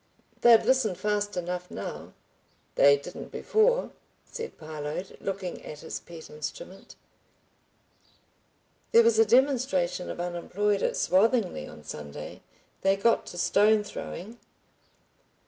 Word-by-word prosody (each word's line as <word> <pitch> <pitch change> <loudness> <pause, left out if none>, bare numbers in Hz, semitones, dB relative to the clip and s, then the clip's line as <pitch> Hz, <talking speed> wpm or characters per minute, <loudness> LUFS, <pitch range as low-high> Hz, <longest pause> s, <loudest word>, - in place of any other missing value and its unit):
"They'd 235 -2 +7
listen 255 -8 +2
fast 205 0 -1
enough 180 0 -4
now." - - -7 0.6
"They 140 0 +6
didn't 140 - -9
before," 480 +1 +2 0.3
said 460 0 -7
Parload, 155 +3 -6
looking 190 -2 -4
at 150 -1 -9
his 160 - -5
pet 165 -2 -11
instrument. 155 - -8 2.0
"There 230 - +8
was 230 -1 +3
a 225 - +7
demonstration 235 -9 +2
of - - -6
unemployed 190 +4 -1
at - - 0
Swathinglea 195 - +2
on 75 - -13
Sunday. 75 -1 -8 0.4
They 195 0 +3
got 225 +4 +2
to 175 - -8
stone 210 +4 +3
throwing." 210 +2 -8
195 Hz, 115 wpm, -27 LUFS, 175-230 Hz, 2.0 s, There